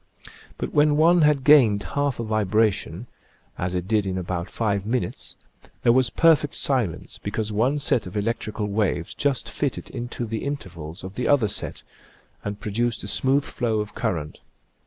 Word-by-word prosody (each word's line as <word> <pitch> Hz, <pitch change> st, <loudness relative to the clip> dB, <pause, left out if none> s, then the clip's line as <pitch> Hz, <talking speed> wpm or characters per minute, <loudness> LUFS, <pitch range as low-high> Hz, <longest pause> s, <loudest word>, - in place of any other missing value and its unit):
But -, -, -4 dB
when 150 Hz, 0 st, +4 dB
one 170 Hz, +2 st, +5 dB
had 150 Hz, -3 st, +3 dB
gained 120 Hz, -9 st, +6 dB
half 145 Hz, -3 st, 0 dB
a -, -, -1 dB
vibration, 110 Hz, -2 st, 0 dB, 0.5 s
as 90 Hz, +1 st, -3 dB
it 90 Hz, 0 st, -2 dB
did 105 Hz, -2 st, +1 dB
in 95 Hz, -1 st, -2 dB
about 90 Hz, 0 st, -3 dB
five 100 Hz, -4 st, -1 dB
minutes, 115 Hz, -3 st, -3 dB, 0.5 s
there 120 Hz, -, +6 dB
was 130 Hz, -1 st, +3 dB
perfect 155 Hz, +1 st, +3 dB
silence, 125 Hz, -, -1 dB
because 105 Hz, +1 st, -3 dB
one 120 Hz, +8 st, +1 dB
set 135 Hz, -7 st, +1 dB
of 90 Hz, -, -6 dB
electrical 110 Hz, 0 st, -2 dB
waves 100 Hz, -4 st, -1 dB
just 140 Hz, -3 st, -1 dB
fitted 145 Hz, -2 st, -3 dB
into 120 Hz, -1 st, -4 dB
the 110 Hz, 0 st, -4 dB
intervals 85 Hz, -, -6 dB
of 95 Hz, 0 st, -7 dB
the 125 Hz, +3 st, -2 dB
other 140 Hz, -7 st, +4 dB
set -, -, -3 dB, 0.6 s
and 105 Hz, 0 st, -4 dB
produced 115 Hz, +3 st, -1 dB
a -, -, -5 dB
smooth 135 Hz, +6 st, +2 dB
flow 115 Hz, -6 st, -1 dB
of 105 Hz, -1 st, -4 dB
current. 75 Hz, -4 st, -3 dB
110 Hz, 165 wpm, -24 LUFS, 100-135 Hz, 0.6 s, gained